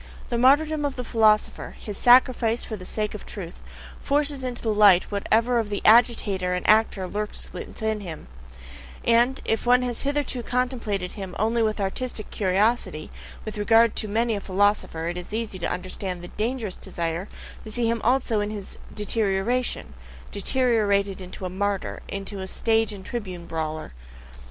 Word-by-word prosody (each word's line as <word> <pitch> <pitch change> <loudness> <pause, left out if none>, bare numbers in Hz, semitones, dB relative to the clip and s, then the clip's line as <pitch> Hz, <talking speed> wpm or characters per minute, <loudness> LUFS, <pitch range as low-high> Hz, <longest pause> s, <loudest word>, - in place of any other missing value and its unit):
The 240 - 0
martyrdom 295 +4 +4
of 285 -2 -1
the 250 - -4
philosopher, 220 -2 +2
his 210 - -6
"sacrifice 240 -1 +4
for 220 - -5
the 185 -3 -8
sake 210 -1 -2
of 210 - -7
truth," 180 -4 -8 0.4
forces 285 -1 0
into 250 -1 -5
the 220 -2 +1
light 205 -4 +6
whatever 230 +4 +2
of 220 -2 -2
the 205 - -3
agitator 210 -5 +4
and 180 - -3
actor 215 -3 +3
lurks 210 +3 -5
in 220 -1 -3
him; 170 -6 -8 0.8
and 240 +3 +3
if 225 - 0
one 250 +1 +5
has 245 -2 -3
hitherto 285 -3 -1
contemplated 235 -7 -2
him 190 -3 -7
only 225 +2 +1
with 215 -1 0
artistic 215 +3 -3
curiosity, 195 -4 0 0.3
with 215 -1 -5
regard 225 +1 +4
to 215 - +1
many 225 +3 +1
a 200 - -4
philosopher 195 -4 +1
it 175 +1 -3
is 180 +3 -10
easy 220 -4 -3
to 170 - -1
understand 180 0 -4
the 175 - -8
dangerous 220 -3 -3
desire 170 +3 -4 0.3
to 220 - -9
see 235 +1 0
him 230 -1 0
also 245 -2 +2
in 205 0 -1
his 205 -2 -8
deterioration 210 +3 -1 0.4
(deteriorated 205 -4 +1
into 185 +1 -7
a - - 0
"martyr," 200 +1 -2
into 195 0 -5
a 190 - -5
stage 225 +3 +1
and 195 -2 -9
tribune 185 -7 -5
bawler). 155 - -4
215 Hz, 165 wpm, -25 LUFS, 195-235 Hz, 0.8 s, light